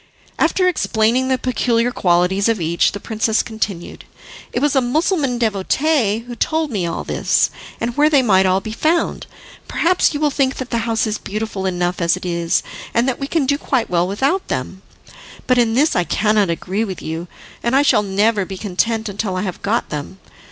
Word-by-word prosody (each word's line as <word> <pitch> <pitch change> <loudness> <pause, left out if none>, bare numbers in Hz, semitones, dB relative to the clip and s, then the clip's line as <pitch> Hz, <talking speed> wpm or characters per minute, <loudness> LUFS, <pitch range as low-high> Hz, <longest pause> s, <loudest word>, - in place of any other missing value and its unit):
After 365 -1 +2
explaining 245 -6 +1
the 260 0 +2
peculiar 245 -1 0
qualities 185 +2 +2
of 225 -3 +1
each, 170 +1 +1
the 205 - -5
princess 220 +1 0
continued: 215 -6 -5 0.5
"It - - -1
was 290 +1 +1
a 265 - +4
Mussulman 280 0 0
devotee 230 +2 +1
who 245 - -7
told 315 +3 0
me 190 -6 -1
all 165 - -3
this, - - +1 0.3
and 235 +1 -2
where 300 +1 +4
they 285 -4 +4
might 190 -4 +4
all 185 +1 +2
be 215 - -6
found. 315 +9 0 0.4
Perhaps 360 +2 +2
you - - -1
will 300 -1 +2
think 270 -1 +1
that 260 -1 -6
the 230 -1 -1
house 225 0 +1
is 215 -1 -2
beautiful 205 -2 -4
enough 180 0 -1
as 170 +1 +2
it 185 - -9
is, 170 -1 0 0.3
and 235 +2 +3
that 260 - -1
we 275 - -3
can 310 -2 0
do 285 +2 +1
quite 255 -10 -1
well 175 0 +2
without 270 - 0
them; 130 +9 -4 0.6
but 255 -1 +3
in 230 -2 +2
this 295 +5 +3
I 180 - +3
cannot 210 +1 +1
agree 185 +5 -2
with 190 -5 -6
you, 165 +2 -5 0.3
and 235 +2 0
I 280 - +5
shall 280 - +4
never 205 +1 +1
be 190 +1 -7
content 220 +4 -1
until 200 -1 -3
I 185 - -2
have 185 -3 -5
got 225 +4 -1
them. 150 +5 -6
220 Hz, 200 wpm, -19 LUFS, 190-260 Hz, 0.6 s, I